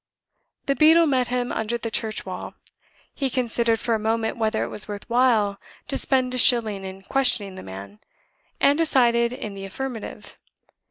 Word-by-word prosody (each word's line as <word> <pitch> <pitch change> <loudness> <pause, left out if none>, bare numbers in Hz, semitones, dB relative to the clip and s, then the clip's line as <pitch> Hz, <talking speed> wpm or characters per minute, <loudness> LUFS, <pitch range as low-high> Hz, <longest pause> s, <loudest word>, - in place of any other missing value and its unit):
The 275 - +2
beadle 320 +3 +6
met 260 -4 +1
him 245 0 -2
under 225 +2 -2
the 230 -1 -5
church 220 0 -1
wall. - - -7 0.6
He 270 -2 -2
considered 235 -2 0
for 235 - -1
a 220 - +1
moment 225 +1 -1
whether 220 -1 0
it - - -4
was 210 - -4
worth 205 -1 -7
while 235 -5 +2 0.3
to - - -1
spend 255 -2 +1
a 255 - +1
shilling 220 -6 +4
in 190 0 -8
questioning 220 -5 0
the 185 - -9
man, 100 +2 -10 0.6
and 285 +2 +3
decided 235 -7 +3
in 215 -5 -6
the 195 0 -8
affirmative. 235 +3 -7
235 Hz, 170 wpm, -23 LUFS, 210-255 Hz, 0.6 s, beadle